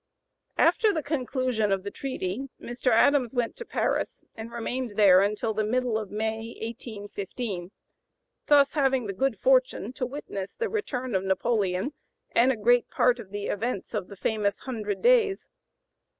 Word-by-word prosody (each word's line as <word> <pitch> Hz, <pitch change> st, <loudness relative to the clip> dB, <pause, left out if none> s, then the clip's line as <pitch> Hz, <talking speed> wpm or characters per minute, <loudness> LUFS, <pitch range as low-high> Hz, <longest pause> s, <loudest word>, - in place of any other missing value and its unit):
After 440 Hz, -3 st, +4 dB
the 315 Hz, -5 st, -2 dB
conclusion 255 Hz, -6 st, 0 dB
of 195 Hz, -1 st, 0 dB
the 200 Hz, -, -5 dB
treaty 260 Hz, 0 st, -4 dB
Mr. 245 Hz, +1 st, -2 dB
Adams 250 Hz, +1 st, +4 dB
went 240 Hz, -2 st, 0 dB
to 475 Hz, -, -7 dB
Paris, -, -, -1 dB
and 225 Hz, +1 st, -8 dB
remained 240 Hz, 0 st, -3 dB
there 195 Hz, -3 st, +7 dB
until 210 Hz, +3 st, 0 dB
the 215 Hz, 0 st, 0 dB
middle 245 Hz, +1 st, 0 dB
of 215 Hz, -2 st, -2 dB
May, 220 Hz, +2 st, -3 dB
1815, 205 Hz, -3 st, -5 dB, 0.8 s
thus 285 Hz, -2 st, +5 dB
having 270 Hz, -4 st, +2 dB
the 200 Hz, -, -3 dB
good 270 Hz, +8 st, 0 dB
fortune -, -, +2 dB
to 255 Hz, -2 st, -3 dB
witness 200 Hz, -8 st, -6 dB
the 460 Hz, -, -2 dB
return 260 Hz, -, -3 dB
of 190 Hz, -1 st, +1 dB
Napoleon 195 Hz, +3 st, 0 dB, 0.4 s
and 250 Hz, +3 st, +4 dB
a 250 Hz, -, -2 dB
great 240 Hz, +3 st, +3 dB
part 250 Hz, 0 st, +2 dB
of 210 Hz, -5 st, -9 dB
the 205 Hz, 0 st, -5 dB
events 215 Hz, 0 st, -3 dB
of 205 Hz, -4 st, -2 dB
the 200 Hz, -, -10 dB
famous 205 Hz, -1 st, -1 dB
"hundred 215 Hz, -6 st, -4 dB
days." 460 Hz, -5 st, +4 dB
235 Hz, 160 wpm, -27 LUFS, 205-265 Hz, 0.8 s, there